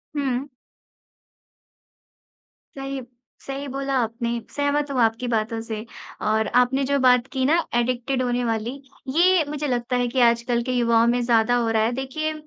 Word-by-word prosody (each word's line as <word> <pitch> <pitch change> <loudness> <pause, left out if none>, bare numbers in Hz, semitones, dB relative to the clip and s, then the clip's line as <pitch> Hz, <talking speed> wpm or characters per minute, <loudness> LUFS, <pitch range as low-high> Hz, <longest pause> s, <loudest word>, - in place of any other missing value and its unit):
हुँ। 270 -1 -1 2.3
सही 270 -1 -5 0.5
सही 275 +1 -4
बोला 275 +1 -3
आपने, 235 +1 -3
सहमत 285 0 -1
हूँ 260 - -1
आपकी 225 +2 +1
बातों 225 0 -1
से। 220 -1 -6 0.4
और 220 0 +2
आपने 265 +2 +1
जो 280 +1 +1
बात 250 -1 +4
की 260 -1 0
ना, 320 +4 +4 0.2
एडिक्टेड 250 +2 0
होने 245 0 0
वाली, 225 +1 -1 0.4
ये 345 +4 +4
मुझे 295 0 -3
लगता 245 0 -1
है 245 0 +1
कि 255 +2 -1
आजकल 235 +1 +1
के 255 - -3
युवाओं 235 -1 +3
में 245 +1 +2
ज़्यादा 235 0 +3
हो 235 -2 +1
रहा 220 -1 +2
है। 230 - +1
देखिए, 310 +4 -3
245 Hz, 160 wpm, -23 LUFS, 235-275 Hz, 2.3 s, बात